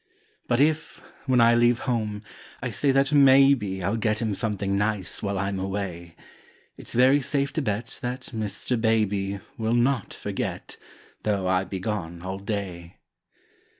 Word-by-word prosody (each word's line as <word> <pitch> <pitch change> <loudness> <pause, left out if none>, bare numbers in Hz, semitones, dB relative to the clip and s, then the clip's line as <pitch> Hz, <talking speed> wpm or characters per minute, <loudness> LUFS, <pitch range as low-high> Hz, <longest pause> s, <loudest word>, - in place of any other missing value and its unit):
But 120 - +1
if, 155 +2 +1 0.3
when 130 -2 +3
I 115 0 +6
leave 120 0 +4
home, 110 -4 -2 0.4
I - - -4
say 145 - +1
that 135 +2 +2
maybe 135 -9 +5
I'll 100 +6 0
get 110 -1 0
him 110 -1 -1
something 100 -2 -1
nice 105 -2 -1
while 100 -1 -2
I'm 95 0 -2
away, 95 -3 -4 0.6
It's - - -8
very 130 +4 +5
safe 140 +1 0
to 155 - -1
bet 115 -2 -2
that 125 +1 -5
Mr. 110 +2 -2
Baby 100 -3 0 0.2
Will 110 +1 +1
not 125 +2 +1
forget, - - -5 0.4
though 100 -3 -1
I 95 0 +1
be 95 0 -5
gone 90 -4 -4
all 95 +1 -4
day. 95 -4 -5
110 Hz, 150 wpm, -25 LUFS, 95-125 Hz, 0.6 s, I